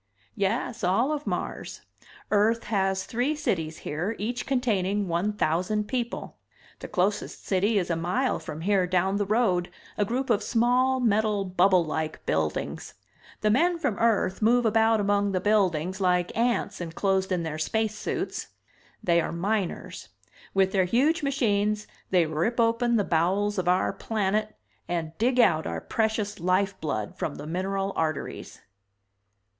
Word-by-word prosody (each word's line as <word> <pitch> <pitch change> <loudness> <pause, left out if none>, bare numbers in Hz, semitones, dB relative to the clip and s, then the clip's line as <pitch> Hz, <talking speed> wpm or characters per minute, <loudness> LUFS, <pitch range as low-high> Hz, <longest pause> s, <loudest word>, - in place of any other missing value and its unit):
"Yes, 220 +2 -1
all 200 +10 +2
of 300 -1 -3
Mars. - - -4 0.5
Earth 220 +2 +3
has 195 -2 0
three 250 +6 -1
cities 175 - -2
here, 175 +9 -2
each 235 +4 -3
containing 205 -7 0
one 175 +5 0
thousand 205 +2 0
people. 240 -1 -4 0.4
The - - -7
closest 200 +3 -1
city 205 +3 +2
is 180 -3 0
a - - +1
mile 180 +11 0
from 155 - -7
here, 190 0 +2
down 185 +2 +1
the 205 -1 -1
road, 195 -5 +2 0.3
a - - +4
group 250 +6 -1
of 205 - +2
small 250 +4 +2
metal 215 -3 +1
bubble 185 -1 +3
like 155 0 -4
buildings. 80 -1 -2 0.5
The 215 - +3
men 340 +9 +3
from 285 -11 -2
Earth 220 -4 +1
move 240 +2 +4
about 225 0 +3
among 205 0 +1
the 185 - +1
buildings 190 -3 +1
like 180 -1 +1
ants 235 -4 0
enclosed 190 +3 0
in 180 -2 0
their 155 -1 -4
space 220 +6 0
suits. 210 - -4 0.6
They 170 -1 +3
are - - -3
miners. 195 +2 -3 0.5
With 190 -1 +3
their 190 -2 +2
huge 275 - +2
machines 210 -7 0 0.2
they 180 -3 +4
rip 165 +10 -1
open 230 +1 +2
the 210 - +3
bowels 190 +5 +1
of 180 - -2
our 180 +2 +2
planet 215 +1 -1 0.3
and 165 -2 -3
dig 250 +3 +2
out 160 -9 +4
our - - -3
precious 220 -2 -1
life 185 +2 0
blood 110 -10 -3
from 145 - -2
the 145 - -8
mineral 195 +4 -2
arteries." 155 -2 -3
200 Hz, 150 wpm, -26 LUFS, 180-225 Hz, 0.6 s, a